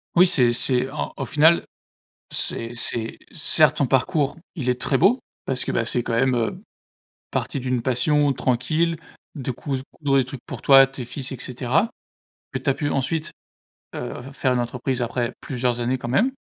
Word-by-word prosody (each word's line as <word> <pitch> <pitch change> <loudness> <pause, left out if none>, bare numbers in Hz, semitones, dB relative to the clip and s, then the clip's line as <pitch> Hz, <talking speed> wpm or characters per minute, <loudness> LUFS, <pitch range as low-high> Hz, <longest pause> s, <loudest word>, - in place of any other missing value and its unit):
Oui, 180 +2 +7
c'est 125 -8 +3
c'est 125 +1 +1
un 150 - -4
au - - -3
final, 160 +3 +4 0.7
c'est 115 +1 -3
c'est, 115 -1 -2 0.2
certes, 155 -2 +3
ton 140 - +2
parcours, 145 +3 +1 0.2
il 135 -7 -2
est 125 0 0
très 135 - +3
beau. 200 - +4 0.3
Parce 130 -1 -1
que, - - -1
bah, 115 - +1
c'est 120 +1 +1
quand 115 - -3
même, 130 +3 +3
heu, 120 +11 -1 0.7
parti 140 - -2
d'une 125 -1 -1
passion 145 +4 +2
tranquille, 140 +7 0 0.4
de 135 -3 -3
cous 135 +2 -3
coudre 140 -2 +1
des 135 - +4
trucs 130 +1 -8
pour - - -7
toi, 135 -1 +8
tes 135 -1 -7
fils, 130 +2 -6
et 130 - -8
cetera, 130 - 0 0.7
et - - -1
tu - - 0
as - - +4
pu 145 -2 -2
ensuite, 150 +4 -1 0.6
heu, - - -5
f 135 +2 -11
faire 130 -1 +1
une - - +1
entreprise 125 +1 -2
après 120 0 -1
plusieurs 125 -2 -1
années 125 +2 0
quand 120 - -5
même, 220 - +2
130 Hz, 190 wpm, -23 LUFS, 125-145 Hz, 0.7 s, toi